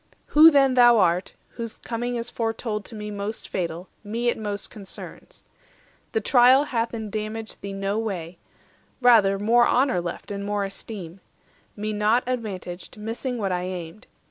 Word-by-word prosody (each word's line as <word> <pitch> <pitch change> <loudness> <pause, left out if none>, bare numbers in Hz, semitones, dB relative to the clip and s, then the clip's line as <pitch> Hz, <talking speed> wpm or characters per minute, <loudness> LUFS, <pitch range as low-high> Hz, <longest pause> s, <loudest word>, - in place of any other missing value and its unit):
Who 310 +2 +10
then 275 -4 +4
thou 240 -2 +7
art, 180 -2 +1
whose 230 -2 -6
coming 240 +1 -3
is 235 0 -3
foretold 225 -2 -3
To 225 - -10
me 210 0 -6
most 205 +2 -5
fatal, 175 0 -4 0.2
me 230 +3 -1
it - - -1
most 205 -2 -4
concerns. 200 -3 -10 0.7
The 220 - +1
trial 255 +4 +6
hath 235 -5 -1
indamaged 220 0 -5
thee 200 0 -5
no 195 +2 -1
way, 180 -6 -4 0.6
Rather 220 -6 +5
more 235 +4 +4
honour 255 -7 +2
left 175 +3 -6
and 200 0 -4
more 205 0 -1
esteem; 195 -3 -8 0.6
Me 215 +1 -3
naught 210 +4 +2
advantaged, 205 -7 -5
missing 230 +4 -4
what 200 -4 -1
I 180 -1 0
aimed. 180 +1 -7
215 Hz, 155 wpm, -24 LUFS, 195-235 Hz, 0.7 s, Who